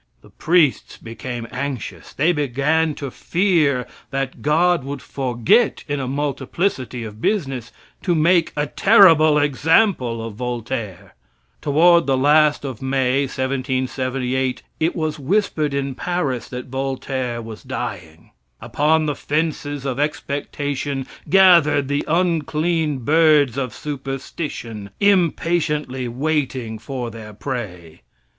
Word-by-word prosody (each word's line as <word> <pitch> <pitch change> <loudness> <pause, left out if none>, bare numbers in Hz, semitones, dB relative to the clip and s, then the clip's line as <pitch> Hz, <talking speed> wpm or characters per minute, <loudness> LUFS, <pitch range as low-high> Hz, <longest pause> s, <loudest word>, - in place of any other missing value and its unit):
The - - -18
priests 165 -5 +1
became 115 +1 -7
anxious. 130 -1 -5
They 155 +5 +2
began 150 +2 0
to 140 -3 -6
fear 160 -9 +1 0.2
that 135 -1 -3
God 165 +1 +2
would 140 +1 -5
forget, 130 - +1
in 145 -1 -2
a 130 - -3
multiplicity 135 -1 -2
of 110 0 -9
business, 135 - -1 0.3
to 175 -3 +1
make 165 +2 +3
a 145 - +1
terrible 165 -4 +5
example 145 - +2
of 115 - -6
Voltaire. 115 -5 -5 0.5
Toward 170 +2 +4
the 135 -1 +2
last 150 +2 +4
of 130 -5 -6
May, 130 0 +1
1778, 130 -1 -2 0.2
it 160 +2 0
was 155 -2 -2
whispered 155 -1 0
in 140 -1 -2
Paris 145 -6 -2
that 125 0 -6
Voltaire 130 -2 -3
was 110 -2 -8
dying. 80 +1 -6 0.3
Upon 155 +2 +1
the 150 - 0
fences 145 -1 -2
of 135 -1 -2
expectation 145 -2 -3 0.2
gathered 170 -7 +5
the 145 0 0
unclean 160 -4 0
birds 150 -4 +4
of 130 -3 -2
superstition, 135 -5 -6
impatiently 165 -8 +1
waiting 130 -4 -2
for 120 0 -5
their 110 -1 -10
prey. 100 - -6
140 Hz, 115 wpm, -21 LUFS, 125-155 Hz, 0.5 s, terrible